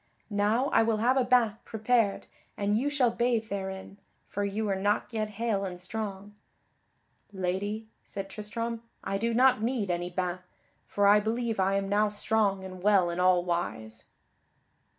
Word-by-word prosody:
Now 215 +6 +2
I - - +4
will 225 -1 +2
have 240 +4 +3
a 265 - +3
bain 245 -4 +3
prepared 220 -2 +1 0.3
and 205 0 +1
you 260 +6 +1
shall 265 -5 +2
bathe 235 -2 0
therein, 190 0 -5 0.3
for 205 - -3
you 205 +2 -1
are 195 - +1
not 205 +4 0
yet 215 -1 -1
hale 220 -4 0
and 180 -2 -5
strong." 200 +1 -5 1.0
"Lady," 200 +3 -2 0.2
said 195 -1 -6
Tristram, 230 +3 -4 0.2
"I 195 0 -2
do 230 +2 0
not 250 -1 +4
need 225 -5 0
any 175 0 -2
bain, 180 0 -2 0.5
for 205 - +1
I 205 +1 +7
believe 225 +1 -1
I 190 +1 +2
am 195 0 0
now 210 +1 +2
strong 205 -2 0
and 185 -1 -8
well 195 -3 +4
in 170 - -4
all 180 -1 +4
wise." 110 -11 -3
205 Hz, 165 wpm, -29 LUFS, 190-225 Hz, 1.0 s, I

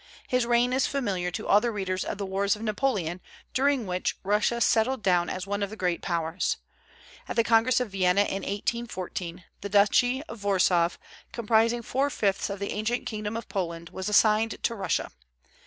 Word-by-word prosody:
His 250 -2 +1
reign 240 +1 +3
is 265 - +2
familiar 195 -10 -1
to 180 - -5
all 205 - +5
the 240 - 0
readers 190 -4 -2
of - - -4
the 200 - -3
wars 195 +1 +1
of 210 - -9
Napoleon, 205 -6 -1 0.3
during 275 -2 +2
which 180 -1 -2
Russia 210 +4 +1
settled 235 +1 +2
down 175 -2 +2
as 185 0 -4
one 200 +1 -2
of 200 - -1
the 215 - -8
great 180 -3 -1
Powers. 165 0 -1 0.7
At - - -4
the 230 - +4
Congress 230 +3 +4
of 250 -5 -3
Vienna 185 0 +3
in 195 -1 -1
1814 195 -5 -4 0.2
the 200 - -5
duchy 245 +7 +3
of 230 -10 -10
Warsaw, 180 -3 +3 0.4
comprising 230 +1 +2
four 270 +5 0
fifths 200 -7 0
of 200 - -4
the 200 +1 -4
ancient 225 +4 -1
kingdom 215 0 -3
of 230 - -7
Poland, 170 -4 -4
was 190 +2 -4
assigned 215 +1 +3
to 235 - +1
Russia. 200 -4 -2
205 Hz, 185 wpm, -27 LUFS, 185-235 Hz, 0.7 s, all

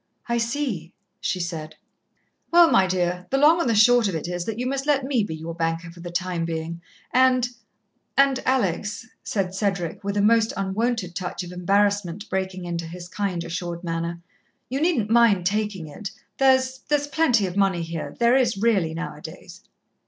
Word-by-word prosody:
"I 235 0 +1
see," 230 - -2 0.3
she 185 - -2
said. 165 -3 -5 0.7
"Well, 345 -1 +6
my 190 -1 +5
dear, 180 0 -1
the 270 - +1
long 310 +5 +5
and 255 - 0
the 230 - +2
short 240 +1 +6
of 190 - -2
it 160 - -3
is, 175 0 -3
that 225 -1 -4
you 250 - -2
must 270 +2 -2
let 280 -2 +3
me 260 -5 +1
be 160 -5 -4
your 160 +1 -6
banker 165 0 -2
for 175 - -15
the 175 +1 -7
time 175 -1 -2
being. 165 0 -4 0.3
And 255 -1 +4 0.7
and, 275 -1 +4
Alex," 210 -3 0 0.2
said 190 -3 -2
Cedric, 195 -3 -2
with 200 +1 -2
a - - +3
most 225 +1 +4
unwonted 195 0 -1
touch 180 0 -4
of 175 - -8
embarrassment 200 +1 0
breaking 190 -1 -2
into 170 -1 -3
his 175 +1 -8
kind, 185 -2 -2
assured 170 0 -5
manner, 170 0 -3 0.5
"you 265 +3 -2
needn't 295 - +1
mind 225 -6 +4
taking 205 -3 -1
it. 195 +7 -7 0.3
There's 260 -1 +3
there's 295 -1 +2
plenty 270 -7 +2
of 180 -1 -4
money 195 -4 +2
here 165 -1 -5
there 235 +1 +4
is 240 -5 +2
really 195 -7 +1
now 170 - -5
a - - -13
days." - - -11
195 Hz, 185 wpm, -24 LUFS, 175-240 Hz, 0.7 s, Well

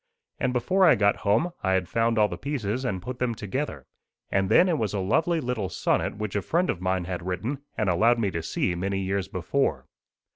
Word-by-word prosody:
And 125 - +1
before 130 +11 +2
I 170 - +7
got 100 0 +2
home 115 +13 +1
I 95 -2 +1
had 95 -2 +1
found 115 +3 +1
all 105 -1 +5
the - - -5
pieces 130 -4 -3
and 95 -5 -2
put 125 +2 -6
them 125 -2 0
together; 105 - -4 0.5
and 95 -1 +1
then 185 - +6
it 165 -5 +1
was 105 -1 -1
a - - 0
lovely 160 - +1
little 125 -8 -2
sonnet 100 - 0
which 105 -2 -4
a 100 - +1
friend 175 - +1
of 90 - -7
mine 95 -1 0
had 90 -1 -4
written 110 - -2 0.2
and 110 - 0
allowed 110 +7 +4
me 105 -4 0
to 85 - -3
see 90 +2 -1
many 95 +3 -2
years 95 0 -1
before. 100 +9 -1
105 Hz, 220 wpm, -26 LUFS, 95-125 Hz, 0.5 s, I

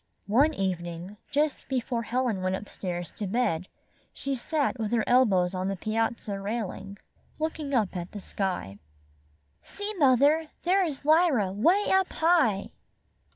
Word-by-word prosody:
One 280 +9 +3
evening, 180 0 -3
just 295 0 0
before 245 -2 -1
Helen 235 -4 -1
went 185 0 0
up 200 +2 -7
stairs 175 -2 -5
to 205 - -5
bed, 190 -5 0 0.4
she 275 - -4
sat 275 0 -1
with 220 -1 -2
her 225 -2 +2
elbows 195 -8 +3
on 185 0 -2
the 195 - -1
piazza 215 0 -2
railing, 200 -1 -4 0.4
looking 310 -2 -3
at 215 -6 +2 0.2
the 210 - -7
sky. 185 - -3 0.8
''See, 410 +1 -5
mother! 285 +3 +4 0.2
there 375 +3 +3
is 300 -6 -3
Lj^ra 295 - +3
'way 350 - +3
up 380 -1 +2
high!" 315 - +2
230 Hz, 140 wpm, -27 LUFS, 195-295 Hz, 0.8 s, mother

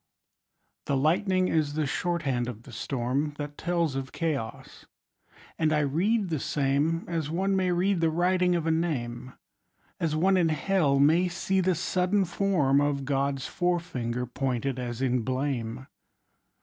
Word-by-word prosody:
The 140 - +1
lightning 185 +6 +2
is 150 -4 0
the 155 -1 0
shorthand 140 -6 -1
of 115 -1 -8
the - - -13
storm 135 +4 -2
That 145 0 -5
tells 170 -3 0
of 135 -1 -4
chaos; 145 -9 -4 0.7
and 155 -1 +2
I 150 -1 +3
read 185 +9 +1
the 155 - 0
same 145 +5 0
As 165 -4 -2
one 190 +4 0
may 185 -1 +1
read 180 +1 +1
the 165 - +3
writing 180 +2 +2
of 170 -2 -1
a 165 - +2
name, 130 -7 -2 0.7
As 160 -2 0
one 190 +4 +3
in 170 -3 +3
Hell 155 -3 +2
may 160 +6 +4
see 190 +2 0
the 185 0 +2
sudden 185 +4 +1
form 165 -7 +2
Of 145 -1 0
God's 135 -1 -1
fore 175 -1 0
finger 125 -7 -3
pointed 130 +1 -2
as 120 0 -4
in 125 -1 +1
blame. 130 -1 -2
155 Hz, 155 wpm, -27 LUFS, 135-175 Hz, 0.7 s, may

